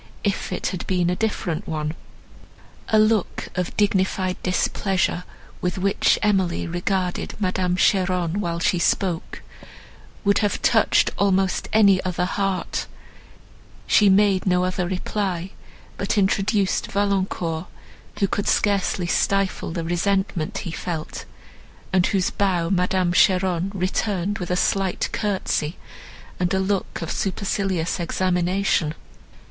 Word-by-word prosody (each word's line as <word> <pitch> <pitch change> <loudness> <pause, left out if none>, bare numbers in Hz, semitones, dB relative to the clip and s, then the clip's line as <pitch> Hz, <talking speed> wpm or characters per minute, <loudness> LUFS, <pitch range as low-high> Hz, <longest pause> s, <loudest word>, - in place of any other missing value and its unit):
if 200 -2 -1
it 180 - -4
had 180 - -5
been 180 -2 +1
a - - 0
different 190 -4 -2
one." 155 -1 -2 1.0
A 220 - +4
look 215 -2 +1
of 180 -1 -3
dignified 190 -2 +1
displeasure, 185 -1 0 0.4
with 180 +2 -1
which 195 +1 +2
Emily 190 -4 +1
regarded 180 +1 -2
Madame 185 -2 0
Cheron, 180 -1 +1
while 170 -3 -2
she 180 0 +1
spoke, 175 -1 -1 0.8
would 200 0 +4
have 205 -1 0
touched - - +3
almost 190 -2 +1
any 200 -4 +5
other 180 -1 -1
heart; 195 0 -2 1.0
she 205 -2 +5
made 195 -1 +3
no 180 0 +3
other 185 -1 -1
reply, 190 -1 -2 0.5
but - - -1
introduced 195 0 +1
Valancourt, 190 -4 -1 0.5
who 200 - +3
could 200 +1 -2
scarcely 195 -3 +1
stifle 195 +2 0
the 165 0 -3
resentment 190 +1 -1
he 170 - -4
felt, 165 -1 -5 0.7
and 185 -2 +4
whose 195 -2 +1
bow 180 -3 0
Madame 180 -1 +1
Cheron 185 0 +3
returned 190 +1 -1
with 180 - -5
a 180 - +1
slight 190 0 0
curtsy, 190 -6 -1 0.6
and 180 0 0
a - - +1
look 190 -2 -2
of 165 - -4
supercilious 195 -3 -1
examination. 180 -2 0
185 Hz, 120 wpm, -23 LUFS, 175-195 Hz, 1.0 s, any